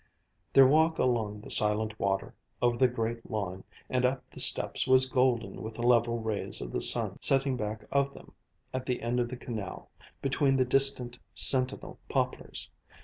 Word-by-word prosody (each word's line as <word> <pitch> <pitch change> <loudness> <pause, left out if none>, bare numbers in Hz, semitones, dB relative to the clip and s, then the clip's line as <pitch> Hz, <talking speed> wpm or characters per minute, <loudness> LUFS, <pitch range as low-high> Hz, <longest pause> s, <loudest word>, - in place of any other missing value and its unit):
Their 135 - +6
walk 160 +4 +2
along 110 -4 -1
the - - -4
silent 110 +1 +3
water, 95 0 -2 0.3
over 120 -1 +1
the 130 +1 +3
great 115 -1 -5
lawn, 95 -3 -5 0.2
and 125 -1 -1
up 125 0 -1
the - - -12
steps - - +3
was 130 0 +5
golden 130 -2 -1
with 110 0 -8
the 120 - -6
level 120 -1 +2
rays 110 -2 -2
of - - -7
the - - -3
sun - - +4
setting 135 -1 +1
back 105 -2 -6
of 140 0 0
them, - - -15 0.4
at 130 0 -5
the 125 -2 -3
end 120 +1 -1
of 120 -1 -1
the 125 - -7
canal, 110 -5 -8 0.3
between 135 0 0
the 130 - +2
distant, 125 -2 +3 0.2
sentinel 130 -1 +2
poplars. - - -3
120 Hz, 175 wpm, -28 LUFS, 110-130 Hz, 0.4 s, Their